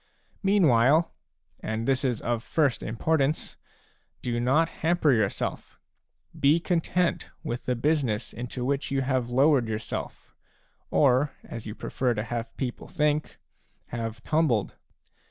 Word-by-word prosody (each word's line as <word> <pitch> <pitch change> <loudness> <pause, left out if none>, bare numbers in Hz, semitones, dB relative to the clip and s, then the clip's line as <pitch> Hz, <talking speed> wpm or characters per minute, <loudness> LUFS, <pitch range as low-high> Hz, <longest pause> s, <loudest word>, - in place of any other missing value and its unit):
Meanwhile, 160 - +4 0.2
— - - -53
and 110 +1 -3
this 135 +1 +2
is 125 -4 0
of 120 -1 -1
first 140 -2 +1
importance, 145 +6 0 0.3
— - - -40
do 120 -1 -1
not 135 +7 +3
hamper 165 -2 +3
yourself; 110 -4 -2 0.6
be 145 +4 +4
content 175 0 0
with 125 -6 -4
the 125 - 0
business 130 -4 0
into 125 +2 -5
which 140 +1 -1
you 135 -1 0
have 130 -2 0
lowered 135 -1 +4
yourself, 110 -1 -5 0.6
or, 135 0 +3
as 115 -2 -8
you 105 - -6
prefer 125 -2 -1
to 105 - -2
have 115 0 -5
people 125 -3 -4
think, 150 0 0 0.5
have 115 -1 -5
tumbled. 150 -10 +1
130 Hz, 135 wpm, -27 LUFS, 115-150 Hz, 0.6 s, Meanwhile